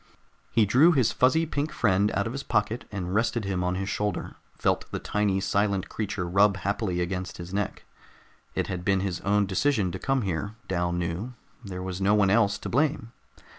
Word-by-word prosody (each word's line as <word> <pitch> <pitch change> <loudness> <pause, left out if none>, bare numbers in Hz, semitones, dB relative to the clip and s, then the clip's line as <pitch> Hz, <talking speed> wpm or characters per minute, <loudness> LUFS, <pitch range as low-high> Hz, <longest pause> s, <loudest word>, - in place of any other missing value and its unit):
He 115 -2 +3
drew 135 - +5
his 130 -7 +3
fuzzy 160 +6 +3
pink 150 -1 -2
friend 100 -1 +2
out 100 - +1
of 115 - -3
his 135 - -3
pocket 110 -1 -1
and 95 -3 -4
rested 115 0 +1
him 95 -2 -1
on 90 0 0
his 95 +1 -3
shoulder, 105 -2 -2 0.2
felt - - 0
the - - -3
tiny 105 -2 0
silent 100 -1 0
creature 100 -4 -3
rub 100 +2 +4
happily 95 -1 -1
against 90 +1 -3
his 85 +1 -8
neck. 105 0 -3 0.7
It - - 0
had 90 -2 -4
been 95 0 +2
his 95 -3 -3
own 100 +1 +2
decision 100 0 +1
to 95 - -5
come 135 +2 0
here, 100 +3 -3
Dal 90 -2 0
knew; 90 +7 -3 0.3
there 90 -3 -6
was 95 0 -4
no 100 +2 +4
one 100 -2 +4
else 100 -2 +3
to - - -7
blame. 140 -3 0
100 Hz, 195 wpm, -27 LUFS, 95-115 Hz, 0.7 s, drew